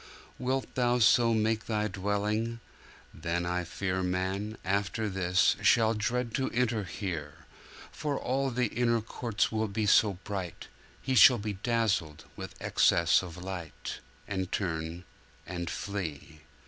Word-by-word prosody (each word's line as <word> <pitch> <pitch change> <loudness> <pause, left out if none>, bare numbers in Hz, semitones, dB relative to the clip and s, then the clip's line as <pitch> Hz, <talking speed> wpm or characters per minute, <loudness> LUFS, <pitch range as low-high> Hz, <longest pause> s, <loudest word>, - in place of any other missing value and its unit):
Wilt 130 +1 -1
Thou 125 -1 +2
so 115 +1 +5
make 110 0 0
Thy 105 -1 0
dwelling? 105 +4 -1 0.5
Then 85 +2 -2
I 90 0 -1
fear 95 +2 -2
Man, 95 +4 -2
after 100 +3 0
this, 95 -2 +2
shall 115 -1 +4
dread 115 +2 -1
to 135 - 0
enter 115 -4 0
here: 85 -7 -5 0.5
For 145 -2 -2
all 135 +2 0
the 125 -2 0
inner 115 0 +1
courts 115 0 -1
will 110 0 0
be 105 +1 -1
so 105 0 +5
bright, 95 -4 -5 0.4
He 130 - -1
shall 125 +1 +8
be 105 -1 -3
dazzled 100 -7 -1
with - - -8
excess 85 -1 +4
of 90 -2 -8
light, 90 -3 -6 0.3
And 95 -1 -3
turn, 85 -2 -3 0.4
and 85 -1 -4
flee! 80 -6 -5
105 Hz, 135 wpm, -30 LUFS, 90-115 Hz, 0.5 s, shall